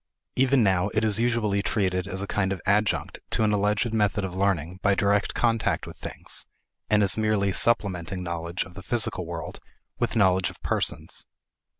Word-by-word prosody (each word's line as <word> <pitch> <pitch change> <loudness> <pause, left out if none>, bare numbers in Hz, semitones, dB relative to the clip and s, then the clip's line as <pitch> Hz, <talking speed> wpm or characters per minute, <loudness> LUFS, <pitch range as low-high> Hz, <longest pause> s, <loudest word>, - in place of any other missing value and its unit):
Even 130 -1 +3
now 95 -2 +2
it 110 - +2
is 110 0 +2
usually 115 -4 +1
treated 95 -3 0
as 95 0 -3
a 100 - -5
kind 95 -2 +1
of 95 - -2
adjunct 105 +2 +1
to - - 0
an 105 -1 +2
alleged 105 +3 +1
method 105 -2 +1
of 95 -1 -4
learning 90 -3 0
by 100 -1 +3
direct 100 0 +1
contact 115 -2 +1
with - - -10
things, - - -4 0.4
and 105 -1 +4
as 100 - +3
merely 105 -3 +1
supplementing 95 -6 +1
knowledge 85 +1 -3
of 90 - -14
the 100 - -9
physical 105 -6 -1
world 85 -1 -6 0.4
with 120 -1 -1
knowledge 95 -4 +3
of - - -13
persons. - - -1
100 Hz, 180 wpm, -26 LUFS, 95-110 Hz, 0.4 s, and